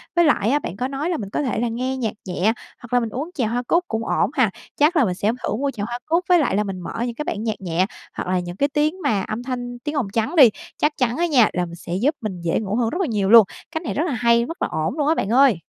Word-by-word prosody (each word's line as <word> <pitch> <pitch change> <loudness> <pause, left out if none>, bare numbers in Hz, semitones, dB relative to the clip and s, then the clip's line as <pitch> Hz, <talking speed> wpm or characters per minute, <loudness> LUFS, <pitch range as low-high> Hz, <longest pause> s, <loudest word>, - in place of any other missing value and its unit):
Với 345 -1 +5
lại 225 -8 +3
á, 290 - +3
bạn 190 - -6
có 250 +3 -1
nói 280 +5 -3
là 340 - 0
mình 200 -3 -6
có - - -1
thể 255 - -1
là 240 - 0
nghe 255 +3 -2
nhạc 225 -4 -2
nhẹ 190 +4 +1 0.3
hoặc 245 0 -11
là 245 - +5
mình 230 -2 -2
uống 275 +9 -4
chè 255 - 0
hoa 240 +3 -1
cúc 345 +1 +3
cũng 225 0 -3
ổn - - +1
ha. 250 -7 +3 0.3
Chắc 300 +5 +3
là 290 -6 +4
mình 180 -3 -1
sẽ 205 +4 +1
thử - - -1
mua 275 +4 -1
chè 210 -5 -5
hoa 240 +3 -4
cúc 335 +3 +1
với 355 -1 +6
lại 280 -10 +1
là 210 - +2
mình 195 -2 -5
mở 180 - -5
những 240 -1 -4
cái 300 - -4
bản 210 - -3
nhạc 220 -3 -3
nhẹ 180 0 +1 0.3
hoặc - - -5
là 185 - +2
những 175 0 -6
cái 285 +5 +2
tiếng 305 +6 0
mà 200 -3 +1
âm 215 +5 -4
thanh, 245 -1 -5
tiếng 295 +5 -4
ồn 265 -8 0
trắng 235 +9 0
đi. 265 -7 +9 0.3
Chắc 300 0 0
chắn 245 -1 0
á 345 - +2
nha, 265 -10 +4
là 180 0 0
mình 170 0 -9
sẽ 170 0 -7
giúp 265 - +1
mình 190 -5 -5
dễ 170 -1 0
ngủ 210 -1 -3
hơn 230 -1 +1
rất 345 - -3
là 365 - +1
nhiều 205 -5 0
luôn. 230 -1 +9 0.3
Cách 320 +1 -4
này - - -3
rất 305 - 0
là 295 - -1
hay, 235 -1 +3
rất 330 +7 -8
là - - +1
ổn 160 - -2
luôn 290 - +1
á 320 - +3
bạn 195 - -1
ơi! 245 -6 +5
240 Hz, 315 wpm, -22 LUFS, 210-290 Hz, 0.3 s, đi